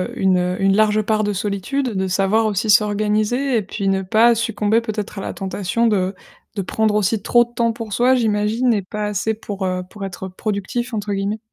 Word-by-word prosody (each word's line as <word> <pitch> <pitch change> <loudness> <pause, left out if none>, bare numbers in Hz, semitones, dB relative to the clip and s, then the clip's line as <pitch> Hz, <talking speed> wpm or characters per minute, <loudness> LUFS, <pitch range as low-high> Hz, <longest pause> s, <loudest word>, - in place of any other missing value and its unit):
une 180 -1 +1
une 195 0 +3
large 215 0 +3
part 215 0 0
de 205 - -1
solitude, 205 +7 -2
de 190 0 0
savoir 195 +4 +2
aussi 215 +1 -1
s'organiser 215 +5 +2
et - - +1
puis 195 0 -3
ne 190 0 0
pas 230 +5 +4
succomber 220 -1 +1
peut-être 215 -3 -5
à - - -4
la - - -4
tentation 195 +4 -1
de 190 -3 0 0.4
de 200 - -1
prendre 215 +3 0
aussi 210 +1 +1
trop 240 +4 +4
de 240 - -12
temps 230 -1 +1
pour 225 -2 -7
soi 250 +5 +3
j'imagine 225 +1 +1
et 205 - 0
pas 210 +3 -4
assez 210 +2 -1
pour, 205 -3 -5
heu, 185 0 -2
pour 200 0 -7
être 190 0 -6
«productif» 215 +5 -3
entre 210 -1 -3
guillemets. 200 +2 -2
210 Hz, 205 wpm, -20 LUFS, 195-225 Hz, 0.4 s, pas